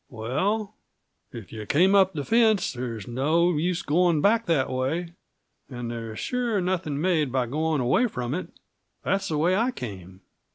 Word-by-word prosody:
"Well, 190 - -2 0.6
if 115 -4 -10
you 110 -2 -7
came 185 +6 +4
up 190 -1 +5
the 145 -3 -4
fence, 220 -4 +3
there's 120 -5 -5
no 155 +8 +2
use 175 +3 -1
going 170 +1 +2
back 220 +7 +2
that 155 -6 +2
way; 160 +7 -2 0.6
and 120 -3 -5
there's 115 -2 -6
sure 245 -4 -1
nothing 175 -6 -1
made 155 -5 +1
by 130 -1 +1
going 155 +3 -1
away 130 - +3
from 125 - -4
it. 180 - -4 0.5
that's 195 0 0
the 155 - -1
way 170 +5 +2
I 230 +5 +2
came. 95 - -8
155 Hz, 165 wpm, -25 LUFS, 125-185 Hz, 0.6 s, up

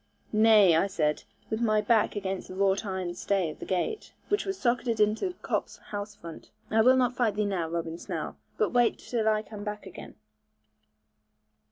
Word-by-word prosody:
'Nay,' 215 -5 +6
I 165 +5 +3
said, 155 -6 -1 0.3
with 220 +1 -1
my 215 -2 +3
back 220 0 +2
against 195 -2 -3
the 185 - -9
wrought 195 +1 +2
iron 185 -2 -3
stay 180 -2 0
of - - -13
the - - -8
gate, 190 - -2 0.2
which 410 - +1
was 385 0 -2
socketed 240 -2 0
into 215 - +1
Cop's - - -2
house 205 0 -7
front: 165 -1 -11 0.2
'I 220 +1 +4
will 255 +3 +6
not 250 -1 +2
fight 225 -5 +1
thee 210 0 0
now, 180 -5 -1
Robin 165 0 -4
Snell, - - -5 0.2
but 435 - +1
wait 240 -1 +3
till 225 -3 -2
I 215 0 +1
come 210 -1 -9
back 210 0 -5
again.' - - -10
210 Hz, 185 wpm, -28 LUFS, 190-230 Hz, 0.3 s, Nay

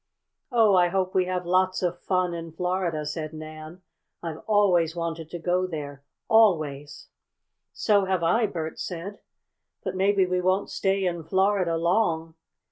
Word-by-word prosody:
"Oh, 225 -4 +4
I 180 -1 +5
hope 185 +1 -1
we 185 -1 +2
have 180 -1 -3
lots 185 +1 +1
of 175 0 -1
fun 185 -2 0
in 165 -1 -7
Florida!" 180 -3 -1
said 155 +1 -4
Nan. 155 +3 -9 0.4
"I've 165 -2 -5
always 180 -6 +3
wanted 165 -2 -4
to 175 - -5
go 180 +2 0
there, 145 -5 -7 0.2
always!" 155 -10 +2 0.6
"So 205 -3 +2
have 185 -2 0
I," 225 +7 +3
Bert 160 -4 -5
said. 185 +3 -6 0.6
"But - - -3
maybe 195 0 +3
we 180 0 0
won't 185 +2 0
stay 195 0 0
in 175 -2 -2
Florida 190 -1 +1
long." 165 -2 +1
180 Hz, 150 wpm, -26 LUFS, 165-190 Hz, 0.6 s, I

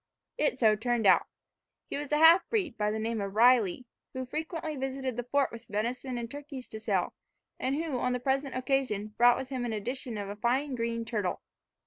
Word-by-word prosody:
It 295 -4 +1
so 220 -4 +4
turned 235 +1 0
out. - - +5 0.6
He - - -5
was 290 0 -5
a 300 - +3
half 325 +4 +7
breed, 400 -8 0
by 210 0 0
the 215 - -2
name 225 0 -2
of 200 0 -4
Riley, 240 -1 +4 0.3
who 260 -1 -4
frequently 315 +3 -4
visited 265 -2 -3
the 245 - -2
fort 275 +2 +1
with 230 0 -10
venison 240 +5 -2
and 235 -1 -5
turkeys 285 -3 -8
to 220 - -7
sell, 200 -5 0 0.5
and 265 +2 0
who 305 -4 -2
on 250 - 0
the 250 - -1
present 270 +1 -1
occasion 255 -5 0
brought 240 0 +6
with 265 0 -5
him 260 -3 -3
in 235 -2 -2
addition 235 +2 -4
a 200 0 -5
fine 260 +6 0
green 230 -1 -2
turtle. 210 -6 -2
250 Hz, 200 wpm, -30 LUFS, 220-270 Hz, 0.6 s, half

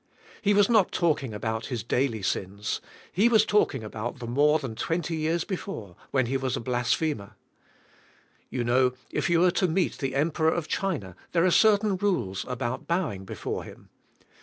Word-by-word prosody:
He 205 -1 +3
was 205 -1 +5
not 220 -6 +4
talking 150 -8 +1
about 110 +1 -3
his 120 -6 -3
daily 115 -3 0
sins. 100 +2 -2 0.3
He 210 +6 +4
was 220 -2 +5
talking 155 - +2
about 110 +4 -5
the 125 - -7
more 145 +6 +3
than 135 -7 -5
twenty 165 +7 -2
years 160 +2 0
before, 175 - -6
when 130 -2 +2
he 135 +3 0
was 130 -1 -1
a - - -3
blasphemer. 120 -1 -1 1.1
You 125 - -2
know, 125 +1 +3 0.2
if - - -1
you 170 0 +4
are 180 - +5
to 185 - +1
meet 175 +2 0
the 135 -2 -2
Kmperor 160 +3 +2
of 165 -2 -3
China 130 - -2 0.2
there 170 0 +4
are 185 - +4
certain 210 0 +4
rules 180 - -1
about 125 -1 -3
bowing 160 - -1
before - - -4
him. - - -13
140 Hz, 175 wpm, -27 LUFS, 120-175 Hz, 1.1 s, was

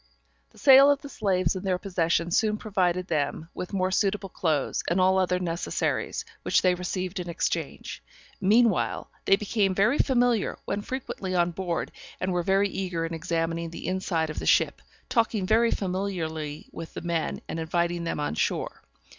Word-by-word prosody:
The - - -23
sale 275 0 +8
of 285 -1 +2
the 285 - -7
slaves 190 -3 +1
in 185 - -4
their 185 -2 +1
possession 175 -3 0
soon 215 +3 +2
provided 185 -4 0
them 155 -1 -2
with 180 - -6
more 185 -2 0
suitable 195 0 0
clothes, 155 -6 0
and 175 +2 +1
all 190 +1 +4
other 180 -1 +2
necessaries, 175 - -2 0.2
which - - +2
they 185 -1 +4
received 180 +1 -3
in 175 -1 -5
exchange. 170 - -3 0.4
Meanwhile, 215 +1 +2
they 195 - +6
became 200 -1 0
very 220 +9 +3
familiar, 245 -5 +2
went 205 0 -3
frequently 210 -7 -4
on 175 0 +2
board, 175 -1 -3 0.3
and 185 0 -1
were 175 - +1
very 195 +3 +2
eager 180 -4 -2
in 165 - -5
examining 165 0 -2
the 165 - -8
inside 175 -4 -1
of - - -5
the - - -5
ship, - - +3 0.3
talking 225 -4 +1
very 225 +4 +4
familiarly 170 -7 -3
with 165 -1 -9
the - - -4
men, 170 -1 -2
and 165 - -4
inviting 170 +1 -1
them 165 - -2
on 145 - -1
shore. - - -2
185 Hz, 170 wpm, -27 LUFS, 170-200 Hz, 0.4 s, sale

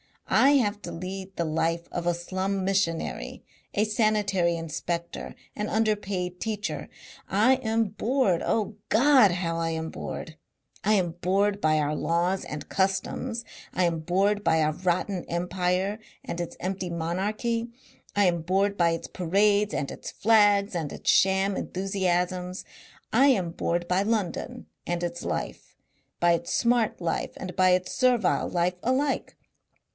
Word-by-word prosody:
I 275 - +6
have 210 -6 +2
to - - -5
lead 190 +2 -6
the 170 - -1
life 165 +2 -1
of 175 0 -3
a 175 - +2
slum 190 +3 -2
missionary, 190 -4 -1 0.3
a 205 - +3
sanitary 210 -5 +1
inspector, 170 +1 -4 0.2
an 210 0 -2
underpaid 200 -5 -1
teacher. 210 -2 -3 0.4
I 220 +7 +4
am 225 -3 0
bored. 215 -3 +1
Oh 215 -1 -1
God! 255 -4 +6
how 170 -2 -2
I 165 0 -1
am 160 0 -3
bored! 160 0 -7 0.5
I 215 - +4
am 180 -5 +2
bored 200 +2 +2
by 155 -4 +2
our 150 0 0
laws 175 +4 0
and 150 -1 -6
customs. 195 +5 -1 0.3
I 185 - +1
am 170 -2 +1
bored 195 +5 +1
by 160 -4 +3
our 155 - +2
rotten 180 +2 -1
empire 180 +3 -1 0.2
and 170 - -5
its 175 - -6
empty 185 0 -3
monarchy. 205 +8 -2 0.5
I 205 0 +4
am 170 -2 +2
bored 195 +4 +1
by 170 -1 +3
its 165 - -3
parades 200 +3 +2
and 140 - -2
its - - -7
flags 205 -2 +4
and 160 -5 -3
its - - +1
sham 190 +1 +3
enthusiasms. 185 -1 -1 0.5
I 275 - +6
am 190 -11 +2
bored 170 +1 -1
by 180 +2 +2
London 205 -4 -2 0.2
and 175 0 -1
its 175 0 -3
life, - - -4 0.5
by 175 0 +5
its 170 - -2
smart 235 -5 +2
life 170 - -1
and 185 -2 -6
by 185 0 +4
its 180 0 +1
servile 250 -6 +2
life 180 +1 0
alike. 265 +3 0
190 Hz, 150 wpm, -27 LUFS, 175-210 Hz, 0.5 s, I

